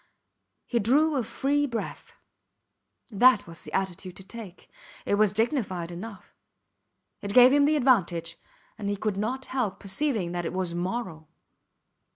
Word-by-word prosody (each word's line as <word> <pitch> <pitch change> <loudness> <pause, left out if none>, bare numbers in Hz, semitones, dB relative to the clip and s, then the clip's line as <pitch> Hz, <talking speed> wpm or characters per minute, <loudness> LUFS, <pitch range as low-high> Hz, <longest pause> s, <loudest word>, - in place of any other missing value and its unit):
He 240 - 0
drew 290 +8 +3
a 260 - +1
free 285 +5 0
breath. 235 -3 -6 1.0
That 230 +1 +5
was 165 0 -11
the - - -10
attitude 185 -1 -3
to 190 - -11
take; 195 -2 -11 0.4
it - - 0
was 210 -1 +4
dignified 210 - -1
enough; 195 +3 -9 0.9
it 200 0 -5
gave 250 +1 +8
him 285 0 +5
the 305 +1 +3
advantage, 195 - +1 0.4
and 200 -1 -3
he 205 - 0
could 210 0 -2
not 250 +6 -3
help 240 -7 -1
perceiving 200 - -1
that 175 0 -3
it - - -5
was 185 -2 -2
moral. 175 -3 -4
210 Hz, 150 wpm, -27 LUFS, 185-255 Hz, 1.0 s, gave